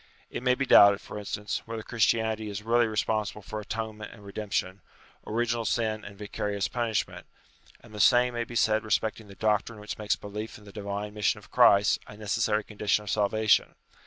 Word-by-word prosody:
It - - -4
may 125 0 +3
be 135 - -1
doubted, 100 -5 +7
for 105 - -8
instance, 105 0 -4
whether 115 -1 -5
Christianity 110 -2 +1
is 100 0 -6
really 120 +1 +3
responsible 105 -1 -1
for 110 - -5
atonement 110 0 -5
and 100 - -14
redemption, 100 -1 -3 0.5
origi 115 +2 0
nal 115 -1 -2
sin 110 -2 -1
and 100 -1 -10
vicarious 105 -1 -3
punishment: 115 -4 -2 0.5
and - - -16
the 105 - -7
same 125 +3 +5
may 120 0 -1
be 120 +1 -10
said 110 -1 +2
respecting 110 0 -1
the 100 - -13
doctrine 110 +2 0
which 105 +1 -7
makes 105 -1 +1
belief 105 +2 -7
in 105 - -17
the 100 - -12
divine 100 +1 -5
mission 105 -1 +1
of - - -15
Christ 100 0 +5
a 105 - -11
necessary 105 0 0
condition 105 0 -1
of 105 - -4
salvation. 110 +1 +2
105 Hz, 190 wpm, -28 LUFS, 105-110 Hz, 0.5 s, doubted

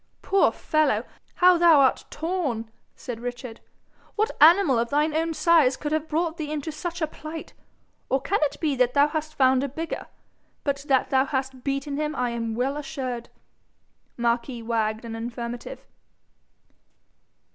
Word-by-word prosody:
'Poor 390 - +3
fellow, 310 -1 +1 0.3
how 360 -1 +5
thou 335 -4 +7
art 265 -2 +3
torn!' 290 -10 -3 0.2
said 240 -3 -7
Richard. 245 -1 -6 0.6
'What 435 +1 0
animal 325 -5 +6
of 235 0 -1
thine 300 +2 +1
own 325 0 0
size 305 -7 +4
could 295 - -4
have 310 0 -1
brought 325 +1 -1
thee 300 -2 -4
into 305 +1 -3
such 335 +2 -4
a - - +4
plight? 310 +1 -9 0.6
Or 265 - +2
can 400 +9 0
it 300 - 0
be 300 -4 0
that 250 +1 +2
thou 285 +1 +5
hast 310 0 -4
found 260 0 +4
a 280 - -2
bigger? 320 +5 -5 0.6
But 280 -1 -2
that 265 -2 +2
thou 265 0 +4
hast 265 -2 -3
beaten 280 +1 -2
him 305 0 -2
I 245 -1 -1
am 230 -1 -3
well 265 +4 -1
assured.' 255 -5 -5 0.9
Marquis 235 0 -1
wagged 225 -1 -1
an 225 -1 -6
affirmative. 235 - -6
280 Hz, 155 wpm, -25 LUFS, 245-315 Hz, 0.9 s, thou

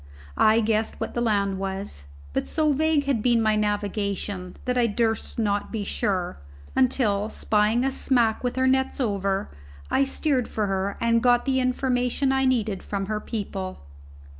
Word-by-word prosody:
I 220 +1 +5
guessed 220 0 0
what - - -4
that 240 - -1
land 200 -4 +1
was, 195 - -5 0.3
but - - -1
so 310 -2 +1
vague 310 0 +2
had 270 -6 +1
been 240 0 +3
my 215 -1 +2
navigation 205 -3 -2
that 250 - 0
I 245 -2 +3
durst 225 +1 -1
not 205 -3 0
be 220 -3 -2
sure; 185 - -2 0.4
until, 220 -5 +2
spying 215 +3 +1
a 270 - +1
smack 240 -5 +1
with 245 - -1
her 260 0 +2
nets 265 +1 +1
over, 195 - -1 0.4
I 275 - +4
steered 270 -3 0
for 215 - -1
her 195 0 -2
and 230 0 +2
got 245 0 +3
the 265 -1 +1
information 255 +1 +1
I 265 0 +2
needed 220 -7 +1
from 200 -1 -3
her 215 +1 -2
people. 195 - -5
220 Hz, 165 wpm, -25 LUFS, 200-255 Hz, 0.4 s, I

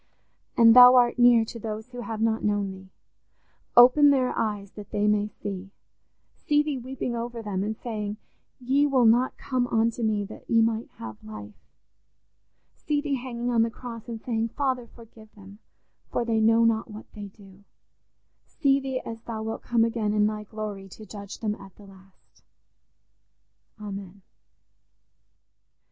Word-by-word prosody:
And 230 0 +7
Thou 250 0 +10
art 245 0 +3
near 240 -2 +6
to 230 - -8
those 220 +1 -6
who 245 -1 -8
have 225 -2 -5
not 225 0 0
known 205 -2 0
Thee: 190 0 -12 0.9
open 255 +4 +8
their 260 -3 +2
eyes 205 -3 -3
that 210 -2 -11
they 205 - -1
may 210 0 +2
see 195 -2 -7 0.8
Thee—see 295 0 +4
Thee 295 -3 -3
weeping 250 -1 -4
over 235 0 -5
them, 195 -2 -2
and 215 +1 -3
saying 210 -3 -5 0.4
'Ye 270 +4 +2
will 260 -4 +3
not 240 +3 +3
come 255 -2 -1
unto 230 0 0
me 215 -2 0
that 215 - -13
ye 230 - +4
might 225 0 -1
have 110 -2 -9
life'—see 105 - -9
Thee 290 -1 -2
hanging 245 -2 -3
on 230 -1 +3
the 230 - +2
cross 230 -1 -9
and 230 -1 -5
saying, 225 -1 -2
'Father, 260 -4 -1
forgive 225 -2 -17
them, 200 0 -14 0.5
for 240 - -1
they 225 -1 +1
know 225 +1 +4
not 225 0 +1
what 215 0 -10
they 205 -2 -8
do'—see 200 +8 -5
Thee 265 -1 -4
as 225 0 -8
Thou 220 -2 -6
wilt 225 0 -5
come 235 -2 +1
again 225 -2 -1
in 210 -1 +3
Thy 210 0 -3
glory 210 -2 -7
to 215 +4 -12
judge 200 -1 -9
them 215 -2 -1
at 195 -2 -13
the 205 - -16
last. 190 -1 -20 1.4
Amen." 200 -2 -8
225 Hz, 160 wpm, -26 LUFS, 205-245 Hz, 1.4 s, Thou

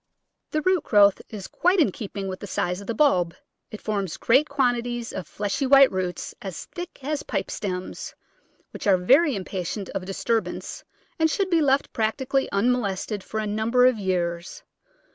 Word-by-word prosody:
The 305 0 -1
root 370 -3 +2
growth 205 -2 +5
is 205 -3 -7
quite 365 +2 +2
in 260 - +4
keeping 200 -1 -6
with 185 -1 -5
the 205 - -7
size 180 0 -2
of 200 - -11
the 230 - -2
bulb; 180 - +3 0.3
it 215 - -8
forms 200 -5 -2
great 265 +6 +3
quantities 245 -3 0
of 185 - -5
fleshy 210 +7 -2
white 275 0 +7
roots 185 -2 -3
as 190 -5 -6
thick 350 -6 -9
as 295 +1 -2
pipe - - -3
stems, 185 -3 -5 0.6
which - - -6
are 195 -2 +6
very 270 - +4
impatient 190 0 -4
of 185 - -4
disturbance 225 +4 -2 0.4
and 320 0 +4
should 375 +3 -1
be 335 -2 +4
left 280 -1 +2
practically 265 +5 0
unmo 240 +5 +2
lested 200 -1 -3
for 220 - -5
a 215 - -2
number 220 +4 +2
of 255 -3 +3
years. 180 - -2
220 Hz, 175 wpm, -25 LUFS, 190-275 Hz, 0.6 s, white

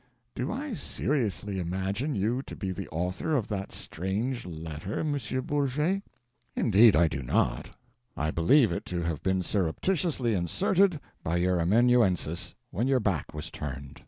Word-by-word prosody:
Do 125 +6 -2
I 275 +3 -3
seriously 105 - -1
imagine 95 - -2
you 115 +6 0
to - - -7
be 95 -2 -3
the 95 0 -5
author 90 - -1
of 120 -7 0
that 100 -2 -3
strange 105 +7 -3
letter, 80 +3 -5
M. 150 -2 0 0.3
Bourget? 145 +6 0 0.5
Indeed 110 0 +6
I 85 - +5
do 70 -3 -3
not. 60 - 0 0.5
I 75 +1 0
believe 115 - +4
it 85 - -2
to 85 -1 -2
have 85 -3 -2
been 95 -1 +1
surreptitiously 120 - 0
inserted 180 - +2 0.2
by 85 +2 0
your 90 0 +2
amanuensis 95 -3 +2 0.2
when 120 +5 0
your 135 -1 +3
back 100 - -1
was 75 - -6
turned. 70 -2 -6
100 Hz, 150 wpm, -28 LUFS, 85-130 Hz, 0.5 s, Indeed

